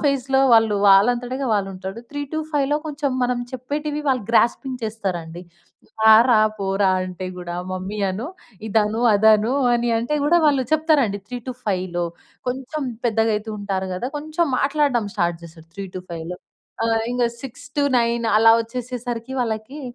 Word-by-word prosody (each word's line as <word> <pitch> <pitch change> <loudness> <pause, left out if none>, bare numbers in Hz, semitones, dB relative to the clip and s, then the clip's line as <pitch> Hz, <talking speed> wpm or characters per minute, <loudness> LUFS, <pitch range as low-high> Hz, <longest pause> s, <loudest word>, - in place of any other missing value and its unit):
ఫేజ్‌లో 270 -2 +1
వాళ్ళూ, 225 -2 +5
వాళ్ళంతటగా 245 +6 +3
వాళ్ళుంటారు. 195 +1 -3
3-5లో 290 0 -1
కొంచం 295 -2 -2
మనం 245 0 +1
చెప్పేటివి 295 +4 -3
వాళ్ళు 255 -3 +1
గ్రాస్పింగ్ 250 +2 +2
చేస్తారండి. 180 -6 -4 0.6
రారా, 220 +2 +7 0.2
పోరా 195 0 +1
అంటే 185 0 -5
గూడా, 175 -1 -6 0.2
మమ్మీ 185 +3 -5
అను, 210 +8 -4 0.4
ఇదను, 215 +1 +1
అదను 220 +3 +4 0.2
అని 240 0 0
అంటే, 235 +6 -2
గూడా 345 +4 +4
వాళ్ళు 275 -3 +3
చెప్తారండి 295 -10 +2
3-5లో. 210 -8 -3 0.4
కొంచం 265 +4 -4 0.2
పెద్దగయితూ 220 -1 0
ఉంటారు 195 -2 -3
గదా! 240 +8 -3
కొంచుం 310 +2 -1
మాట్లాడడం 275 -6 +1
స్టార్ట్ 170 -4 -1
చేస్తారు 165 -1 -14
3-5లో. 180 -3 -7 0.5
ఆహ్, 225 0 +1
ఇంగ 245 -1 +1 0.2
6-9 260 -3 -1
అలా 225 +1 +7
ఒచ్చేసేసరికి, 245 +1 -5
వాళ్ళకి 225 +5 -4
230 Hz, 120 wpm, -22 LUFS, 200-270 Hz, 0.6 s, రారా